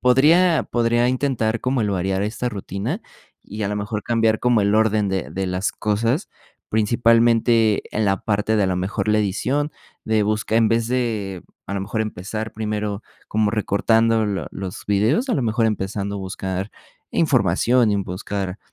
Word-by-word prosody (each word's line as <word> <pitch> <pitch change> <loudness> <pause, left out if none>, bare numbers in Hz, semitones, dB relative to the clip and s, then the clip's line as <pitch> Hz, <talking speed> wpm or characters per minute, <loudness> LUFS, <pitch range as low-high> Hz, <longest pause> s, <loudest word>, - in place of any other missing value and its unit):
podría 155 +7 +4
podría 120 +1 +2
intentar 125 -4 0
como 130 -1 0
el 105 -2 0
variar 95 +1 -1
esta 115 +4 -2
rutina 105 - -4 0.5
y 105 +2 -6
a 100 - 0
lo 105 - -2
mejor 105 +1 -3
cambiar 115 -2 +1
como 120 -3 +3
el 100 +1 +2
orden 110 -2 +2
de 95 -1 -2
de 95 0 -3
las 90 +2 -1
cosas, 115 - -1 0.4
principalmente 115 0 +3
en 110 - +1
la 95 0 0
parte 105 +1 +1
de, 105 - +3
a - - +1
lo 95 - 0
mejor, 95 +4 -2
la 105 0 +3
edición 130 +9 0 0.3
de 110 -1 +2
buscar 110 +1 0
en 110 -2 +4
vez 115 0 +1
de, 110 -7 -2 0.2
a 100 - -4
lo 100 - -2
mejor, 105 +3 -3
empezar 110 +1 -4
primero 105 -1 -3 0.3
como 110 -1 +1
recortando 110 +1 +2
lo 100 -2 -2
los 95 -1 -7
vídeos, 110 - +2
a - - +2
lo 135 - 0
mejor, 115 0 +1
empezando 100 -1 -2
a - - -4
buscar 95 +1 -4 0.4
información 120 - +2
y 100 - +1
buscar 95 +1 -4
110 Hz, 175 wpm, -21 LUFS, 100-115 Hz, 0.5 s, podría